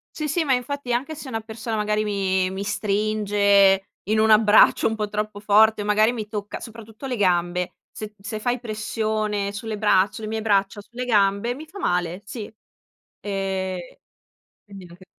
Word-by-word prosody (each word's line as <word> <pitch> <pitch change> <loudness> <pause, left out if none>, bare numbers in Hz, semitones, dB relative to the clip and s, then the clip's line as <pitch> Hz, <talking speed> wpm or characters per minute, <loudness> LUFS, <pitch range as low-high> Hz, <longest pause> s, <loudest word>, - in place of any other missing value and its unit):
Sì, 305 -1 -3
sì, 320 +3 0
ma 270 -3 +2
infatti 250 0 -2
anche 280 +6 -2
se 290 - -9
una 225 -3 -3
persona 220 0 -5
magari 210 0 0
mi 190 -2 0
mi 190 +1 -5
stringe 200 -1 +2 0.2
in 215 +2 0
un 220 0 +3
abbraccio 215 0 +6
un 220 - -1
po' 210 -1 -3
troppo 210 -1 -3
forte 215 +1 +4
o - - -4
magari 215 +2 +3
mi 215 -3 -5
tocca, 205 -1 -5
soprattutto 225 +2 -10
le 250 - -2
gambe, 180 -2 +1 0.2
se 215 -1 -8
se 205 +2 -5
fai 245 +2 -1
pressione 215 -2 -2
sulle 220 +1 -5
braccia 200 -2 +3
sulle 215 +2 -7
mie 220 0 -3
braccia 200 0 +1
o - - -19
sulle 245 +3 -6
gambe, 205 +1 +2
mi 310 +3 -9
fa 385 +6 -11
male, 180 - -1
sì, 220 0 -6 0.8
ehm, 190 -2 -2 0.9
quindi 195 -3 -11
neanche 175 +2 -15
210 Hz, 180 wpm, -23 LUFS, 200-225 Hz, 0.9 s, abbraccio